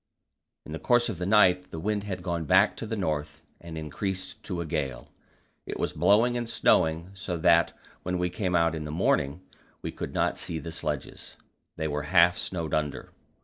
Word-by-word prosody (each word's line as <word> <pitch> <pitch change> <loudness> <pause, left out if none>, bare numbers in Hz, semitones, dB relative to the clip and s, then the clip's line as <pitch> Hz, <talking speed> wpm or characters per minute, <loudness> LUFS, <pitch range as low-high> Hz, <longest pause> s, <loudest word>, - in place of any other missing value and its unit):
In - - -9
the 80 - -4
course 120 +7 +3
of 95 -6 -5
the 90 - -2
night 90 -3 +4
the 80 - -6
wind 105 +3 -1
had 90 -3 -5
gone 85 -3 -2
back - - +4
to - - -5
the - - -2
north, 75 -1 -3 0.2
and 85 -1 -8
increased 95 +6 -4
to 90 -3 -3
a 85 - -2
gale. 70 -6 -3 0.6
It - - -5
was - - -1
blowing 115 +4 +4
and 120 -1 -3
snowing 85 -5 +2
so 95 -2 -4
that 85 +1 +4 0.2
when 90 0 -2
we 90 0 -1
came 90 -1 -1
out 85 -1 +3
in 80 -1 -4
the - - -5
morning 75 0 +1 0.4
we - - -3
could - - -6
not - - +1
see 80 - -3
the 85 +1 -6
sledges; 75 -4 -5 0.4
they 80 - -2
were 75 0 -2
half 85 -1 +5
snowed 85 -4 -4
under. 75 -2 -2
85 Hz, 195 wpm, -27 LUFS, 80-95 Hz, 0.6 s, half